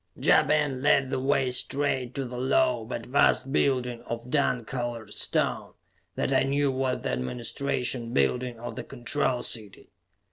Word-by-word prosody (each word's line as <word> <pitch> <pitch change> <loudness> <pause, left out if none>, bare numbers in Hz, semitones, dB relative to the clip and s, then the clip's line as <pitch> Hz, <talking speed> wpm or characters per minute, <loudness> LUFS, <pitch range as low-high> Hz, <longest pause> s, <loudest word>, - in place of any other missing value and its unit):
Ja - - +5
Ben 150 -3 +1
led 140 -2 +3
the - - 0
way 135 -1 +1
straight 130 -1 -1
to 135 - -2
the 125 0 -7
low 125 -2 +2
but 115 -1 -5
vast 135 0 +3
building 125 -5 +1
of 120 +2 -5
dun 125 -5 +1
colored 120 -4 -4
stone - - -1 0.4
that - - 0
I - - +4
knew 140 0 +1
was 130 -1 -1
the - - -1
administration 120 - -2
building 120 - 0
of 120 - -6
the 125 - -5
Control 125 0 -1
City. 105 -4 -5
125 Hz, 155 wpm, -27 LUFS, 120-135 Hz, 0.4 s, Ja